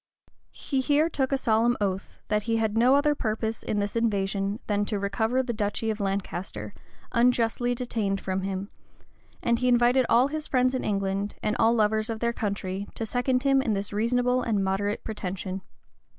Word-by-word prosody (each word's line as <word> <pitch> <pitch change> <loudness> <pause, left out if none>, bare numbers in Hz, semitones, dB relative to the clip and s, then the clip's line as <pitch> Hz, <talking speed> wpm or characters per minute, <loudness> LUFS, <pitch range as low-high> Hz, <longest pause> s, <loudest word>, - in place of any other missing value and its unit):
He 270 -2 -2
here 295 +4 +3
took 265 -2 0
a 275 - +2
solemn 235 -1 +2
oath, 195 -1 -2
that 210 0 +1
he 225 - +2
had 220 -1 0
no 245 +4 +5
other 295 +1 +3
purpose 220 -3 -2
hi - - 0
this 205 0 -1
invasion 200 -2 0
than 205 -1 +1
to 210 - -2
recover 220 +6 0
the 245 -2 -3
duchy 215 +1 -1
of 215 - -5
Lancaster, 190 - -3 0.4
unjustly 240 0 +2
detained 220 -5 -1
from 190 0 -2
him; 195 +1 -4 0.7
and 235 -1 +2
he 250 - +1
invited 245 +1 +4
all 250 +4 +5
his 310 0 -4
friends 255 -1 +2
in 260 - -1
England, 195 0 -1
and 210 - +1
all 230 +1 +4
lovers 215 0 +2
of 225 -1 -3
their 235 0 0
country, 200 -2 -3
to 225 - -3
second 250 +3 0
him 275 -1 +4
in 230 -5 0
this 200 0 -3
reasonable 245 +4 +1
and 215 -5 0
moderate 200 +2 -1
pretension. 190 -2 -4
220 Hz, 180 wpm, -27 LUFS, 200-245 Hz, 0.7 s, no